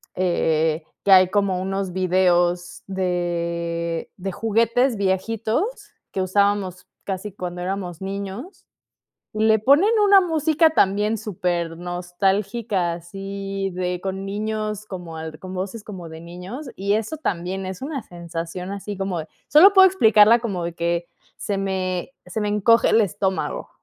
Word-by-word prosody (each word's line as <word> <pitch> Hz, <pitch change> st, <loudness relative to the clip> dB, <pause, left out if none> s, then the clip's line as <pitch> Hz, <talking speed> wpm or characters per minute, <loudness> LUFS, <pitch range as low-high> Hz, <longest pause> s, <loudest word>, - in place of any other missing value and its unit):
eh, 160 Hz, -3 st, +1 dB, 0.2 s
que 200 Hz, -, +2 dB
hay 185 Hz, -1 st, +8 dB
como 195 Hz, -2 st, +1 dB
unos 195 Hz, 0 st, -2 dB
videos 175 Hz, -1 st, +1 dB
de 170 Hz, -2 st, -2 dB
de 195 Hz, 0 st, -4 dB
juguetes 230 Hz, +4 st, +1 dB
viejitos 220 Hz, -, 0 dB, 0.5 s
que 190 Hz, -, -2 dB
usábamos 195 Hz, -1 st, 0 dB, 0.2 s
casi 195 Hz, +1 st, -4 dB
cuando 180 Hz, -2 st, -5 dB
éramos 180 Hz, -2 st, -4 dB
niños, 200 Hz, -, -6 dB, 0.7 s
y 215 Hz, -, -1 dB
le 220 Hz, 0 st, +5 dB
ponen 285 Hz, -, +5 dB
una 400 Hz, -1 st, +7 dB
música 320 Hz, -1 st, +3 dB
también 210 Hz, -4 st, +2 dB
súper 175 Hz, -4 st, -2 dB
nostálgica, 185 Hz, +2 st, -1 dB
así 195 Hz, +2 st, -5 dB
de 180 Hz, -1 st, -2 dB
con 190 Hz, +1 st, -4 dB
niños 215 Hz, +1 st, -3 dB
como 175 Hz, -5 st, -7 dB
al 160 Hz, -1 st, -7 dB
con 185 Hz, 0 st, -8 dB
voces 195 Hz, +4 st, -5 dB
como 185 Hz, -5 st, -8 dB
de 160 Hz, 0 st, -10 dB
niños. 180 Hz, -, -8 dB
Y 200 Hz, +1 st, 0 dB
eso 220 Hz, +8 st, -2 dB
también 190 Hz, -, -3 dB
es 185 Hz, +3 st, -6 dB
una 275 Hz, -3 st, -4 dB
sensación, 170 Hz, +1 st, -6 dB
así 200 Hz, 0 st, -6 dB
como 190 Hz, -3 st, -2 dB
de 155 Hz, -, -9 dB, 0.2 s
solo 365 Hz, +7 st, +8 dB
puedo 380 Hz, 0 st, +9 dB
explicarla 225 Hz, -, +6 dB
como 195 Hz, -7 st, -3 dB
de 170 Hz, -, -3 dB
que 170 Hz, 0 st, -1 dB, 0.3 s
se 200 Hz, -1 st, -3 dB
me 190 Hz, +3 st, -2 dB
se 220 Hz, -, -4 dB
me 210 Hz, -, 0 dB
encoge 210 Hz, +3 st, +4 dB
el 225 Hz, -, +5 dB
estómago. 195 Hz, -1 st, -2 dB
195 Hz, 145 wpm, -22 LUFS, 175-215 Hz, 0.7 s, puedo